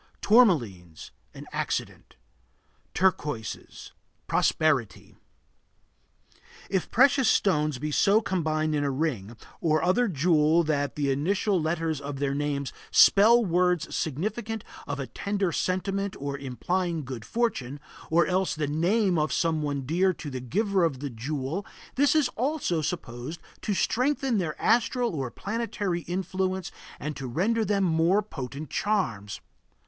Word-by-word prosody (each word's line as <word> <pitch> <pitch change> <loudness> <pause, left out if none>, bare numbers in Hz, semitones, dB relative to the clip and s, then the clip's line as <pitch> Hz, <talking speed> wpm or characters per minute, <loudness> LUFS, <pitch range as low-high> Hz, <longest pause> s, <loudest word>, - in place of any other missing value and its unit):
Tourmalines 120 - +2 0.2
An - - -9
accident. - - -4 0.8
Turquoises 150 - -2 0.3
Prosperity. 135 - 0 1.6
If 190 -3 0
precious 265 0 +4
stones 150 -7 +2
be 150 +4 -4
so 200 +8 +4
combined 155 -7 -1
in 145 -1 0
a 140 - 0
ring, 130 -7 -2 0.2
or 155 -2 +1
other 230 +7 +3
jewel 160 -1 +3
that 145 -3 -1
the 140 -2 0
initial 185 +6 +1
letters 160 -1 -1
of 140 0 -5
their 140 0 -1
names 140 -1 -2 0.2
spell 225 +4 +6
words 180 -2 +1
significant 215 - -3 0.2
of 145 -1 -4
a 135 - -2
tender 200 +3 -2
sentiment 195 +3 -1
or 140 0 -3
implying 160 +5 -2
good 125 -3 -6
fortune, 145 - -2 0.3
or 165 0 +4
else 185 +2 0
the 155 -1 -1
name 175 +5 +1
of 155 0 0
someone 150 -5 -1
dear 180 +6 +2
to 145 - -7
the 130 -1 -5
giver 195 - 0
of 150 -6 0
the 140 -1 -5
jewel, 135 - -3 0.3
this 285 +3 +3
is 305 -4 +4
also 250 - -1
supposed 145 -1 -5 0.2
to 205 - -1
strengthen 255 +1 +1
their 160 -4 -3
astral 240 0 +2
or 135 -5 -3
planetary 200 - -3
influence 185 +1 -2 0.3
and 150 +1 -4
to 135 -3 -6
render 210 - +1
them 205 -2 +1
more 170 +4 +3
potent 140 - -7
charms. 115 - -1
165 Hz, 135 wpm, -27 LUFS, 145-200 Hz, 1.6 s, spell